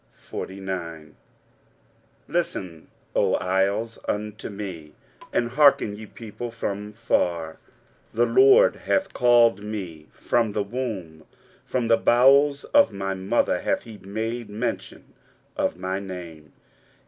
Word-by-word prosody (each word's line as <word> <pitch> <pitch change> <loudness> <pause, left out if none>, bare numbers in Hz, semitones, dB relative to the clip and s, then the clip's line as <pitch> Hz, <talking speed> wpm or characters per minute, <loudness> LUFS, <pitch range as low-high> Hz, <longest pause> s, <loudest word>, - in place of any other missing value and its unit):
23:049:001 90 -5 -6 1.1
Listen, 85 -4 -3 0.3
O - - +3
isles, 100 +5 0
unto 105 0 -3
me; 95 -7 -7 0.4
and 120 - 0
hearken, 135 -6 +4
ye 110 +1 -10
people, 115 +2 -8
from 105 -3 -4
far; 85 -7 -1 0.5
The 120 +2 +2
LORD 415 - +5
hath 290 - -1
called 120 -4 +4
me 90 -8 -6
from 115 -3 0
the 105 - 0
womb; 100 -9 -5 0.4
from 125 -3 -2
the 115 0 +5
bowels 140 +4 +4
of 285 0 +4
my 95 0 -3
mother 95 +1 0
hath - - -1
he 110 -3 -11
made 110 +3 -4
mention 110 +4 -5 0.4
of - - -1
my 95 +1 -3
name. 85 -6 -9
105 Hz, 115 wpm, -24 LUFS, 95-120 Hz, 1.1 s, LORD